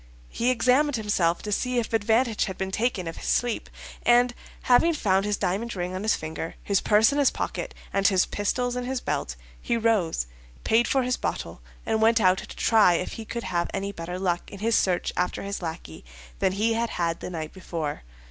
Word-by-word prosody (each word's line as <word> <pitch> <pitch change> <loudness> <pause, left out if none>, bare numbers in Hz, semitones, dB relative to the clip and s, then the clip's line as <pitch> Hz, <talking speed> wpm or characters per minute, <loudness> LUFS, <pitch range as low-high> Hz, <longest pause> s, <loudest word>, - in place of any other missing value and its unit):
He 240 - 0
examined 255 +3 +3
himself 195 -6 0
to 210 - -4
see 250 +4 0
if 230 -1 -1
advantage 225 +1 +2
had 190 -2 -6
been 190 0 -3
taken 210 -4 -1
of 165 - -6
his - - -7
sleep, 245 -2 0 0.3
and 240 0 +4 0.3
having 310 +7 +4
found 195 -7 +2
his 210 -1 0
diamond 210 +6 -2
ring 180 0 -3
on 185 - -4
his 215 +1 +2
finger, 160 +1 -5
his 200 -1 +1
purse 215 +4 +4
in 285 - 0
his 280 - +5
pocket, - - -4 0.2
and 195 0 +3
his 190 -2 +3
pistols 245 +4 -1
in 250 0 -3
his 260 0 -2
belt, - - -3 0.3
he 235 - 0
rose, 215 - +1 0.4
paid 230 +2 +3
for 265 -1 +2
his 250 0 0
bottle, - - -4 0.2
and 220 -1 0
went 225 +1 +5
out 185 -2 +4
to - - -9
try 215 -6 +4
if - - -2
he 225 - -7
could 235 +2 -5
have 175 -2 -1
any 200 +1 -2
better 175 -1 -6
luck 180 -2 -1
in 200 - -8
his 225 +3 +1
search 180 -2 +1
after 180 0 -1
his 200 0 -4
lackey 160 - -7 0.4
than 185 - +2
he 220 +4 +1
had 230 +1 0
had 170 -1 -1
the - - -6
night 160 -3 -5
before. 165 -5 -4
210 Hz, 210 wpm, -26 LUFS, 180-235 Hz, 0.4 s, his